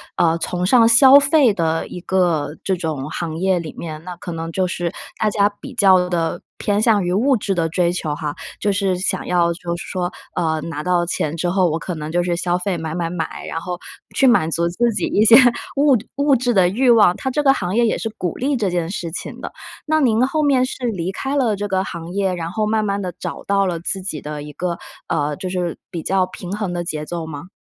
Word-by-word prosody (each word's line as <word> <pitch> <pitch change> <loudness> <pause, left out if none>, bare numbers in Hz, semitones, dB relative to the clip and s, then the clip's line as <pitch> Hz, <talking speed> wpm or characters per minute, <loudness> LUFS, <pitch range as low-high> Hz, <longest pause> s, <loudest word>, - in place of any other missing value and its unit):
呃， 165 0 +2
崇 180 +1 -2
尚 230 +3 +5
消 260 +4 +8
费 280 -4 +4
的 165 -3 0
一 180 - -7
个 170 -5 0
这 190 -1 0
种 155 -5 -3
行 165 -2 -4
业 185 0 +1
里 160 -3 -7
面， 155 -2 -6
那 180 - -6
可 175 0 -8
能 165 0 -4
就 190 +1 +1
是 175 -1 -3 0.3
大 215 - +3
家 205 -1 +2
比 275 - -9
较 190 -4 +5
地 170 -2 -1 0.2
偏 205 0 0
向 215 -4 +3
于 175 - -1
物 260 +8 +3
质 200 -1 -2
的 170 -3 0
追 170 +1 +1
求 155 -4 -2
哈。 150 -2 -4 0.3
就 205 - +2
是 195 -2 0
想 185 - -2
要 175 -1 +2
就 170 0 -4
是 - - -7
说 180 -1 -2 0.2
呃， 160 -3 0
拿 150 -2 -5
到 175 0 +1
钱 155 -2 -2
之 175 - -1
后， 185 -1 +2
我 160 - -1
可 180 - -5
能 150 -1 -5
就 175 +1 +1
是 175 -1 0
消 175 0 0
费 185 +1 -2
买 160 -1 -4
买 170 -1 -2
买， 165 -3 -4
然 165 - -4
后 180 +1 -5 0.4
去 270 - +3
满 240 -11 +4
足 170 +1 +1
自 235 +8 +1
己 - - -1
一 210 - +2
些 230 - +8 0.4
物 285 -1 +4
质 210 - -10
物 285 0 +2
质 245 0 0
的 185 -4 +4
欲 245 +7 +2
望， 210 -6 +6
它 265 - -2
这 290 +3 0
个 270 - +6
行 185 -6 -3
业 235 0 +4
也 220 - +1
是 225 - -3
鼓 180 -3 -3
励 275 +2 0
这 210 -5 0
件 175 -2 -1
事 175 -3 -4
情 170 - -6
的。 - - -6 0.3
那 315 0 +2
您 245 -3 +3
后 305 +4 -1
面 265 -3 +3
是 255 -1 -5
离 185 -5 -2
开 270 +8 -3
了 240 -7 +2
这 205 +1 -3
个 190 -1 0
行 170 -2 -7
业， 195 -1 0
然 170 -1 -4
后 215 +3 -1
慢 215 0 +1
慢 200 -1 -1
地 180 -2 -4
找 - - -5
到 200 0 +2
了 170 -2 -2
自 190 +3 -2
己 185 -6 -4
的 150 0 -5
一 150 - -9
个， 175 +1 -3 0.3
呃， 145 -1 -1
就 185 - -5
是 180 -2 -2
比 170 -3 -4
较 190 -1 +2
平 180 0 -9
衡 205 -4 -3
的 175 0 -2
节 155 -2 -4
奏 170 -1 -5
吗？ 160 +3 -8
180 Hz, 265 characters per minute, -20 LUFS, 170-215 Hz, 0.4 s, 消